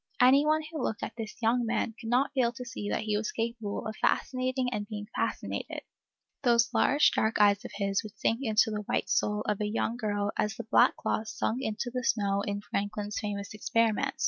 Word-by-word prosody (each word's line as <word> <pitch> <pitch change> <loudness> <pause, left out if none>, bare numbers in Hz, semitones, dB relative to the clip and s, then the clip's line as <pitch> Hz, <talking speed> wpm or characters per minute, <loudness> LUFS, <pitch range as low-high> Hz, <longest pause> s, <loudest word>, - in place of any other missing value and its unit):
Any 270 +4 +6
one 310 0 +3
who 315 -4 -4
looked 220 - -2
at - - -5
this 225 -2 -6
young 240 +2 +3
man 230 0 -1
could 225 - -5
not 250 +4 +2
fail 250 -4 +2
to 250 0 -7
see 210 -3 -5
that - - -1
he 215 -1 0
was 210 +1 -1
capable 225 -2 -3
of 215 - -4
fascinating 255 0 0
and 205 -1 -3
being 210 -1 -5
fascinated. - - -3 0.6
Those 235 -3 +3
large, 285 +2 +4
dark 220 0 +1
eyes 205 -1 +5
of - - -8
his 200 -1 0
would 215 -1 -11
sink 225 +3 +1
into 220 -3 +3
the 210 -1 -2
white - - 0
soul 210 0 +1
of 210 -1 -1
a 210 - 0
young 225 +2 -1
girl 205 -3 -1
as 210 +1 0
the 235 - -6
black 220 - +4
cloth 220 - -1
sunk 220 +3 -2
into 240 0 -3
the 250 -1 -2
snow 200 -4 +1
in 205 0 -3
Franklin's 205 0 -3
famous 200 -1 -4
experiment. 230 +5 +1
220 Hz, 210 wpm, -29 LUFS, 210-245 Hz, 0.6 s, Any